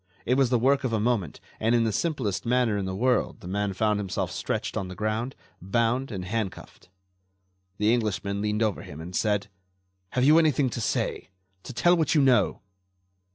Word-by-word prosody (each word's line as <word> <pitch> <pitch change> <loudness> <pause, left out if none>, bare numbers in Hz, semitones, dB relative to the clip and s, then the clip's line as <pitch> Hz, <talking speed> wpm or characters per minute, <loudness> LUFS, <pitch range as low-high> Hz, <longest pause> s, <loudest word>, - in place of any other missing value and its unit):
It 125 - +2
was 135 -1 +3
the 125 - +3
work 135 +4 +2
of 125 -3 -1
a 110 - +1
moment, 105 -8 -1 0.2
and 115 +2 +2
in 115 - +3
the 110 - +1
simplest 130 - -1
manner 120 -2 +2
in 100 -1 -2
the 95 0 -3
world 125 +4 0
the - - -9
man 100 +2 -1
found 105 +2 +1
himself 95 -3 -2
stretched - - -3
on 95 - -2
the 95 - -8
ground, 110 +6 -2 0.3
bound 115 +7 0
and 95 -3 -5
handcuffed. 105 -2 -5 0.9
The 105 +2 +3
Englishman 100 -3 -1
leaned 105 +1 0
over 105 -4 -1
him 75 - -10
and 90 +3 -7
said: 105 -2 +1 0.7
"Have 125 - +1
you 155 +4 +7
anything 145 -5 +2
to 120 - -4
say?... - - -2 0.3
To - - -8
tell 175 +8 +3
what 160 -3 +1
you 150 - +5
know?" 125 -7 +3
110 Hz, 195 wpm, -26 LUFS, 100-125 Hz, 0.9 s, you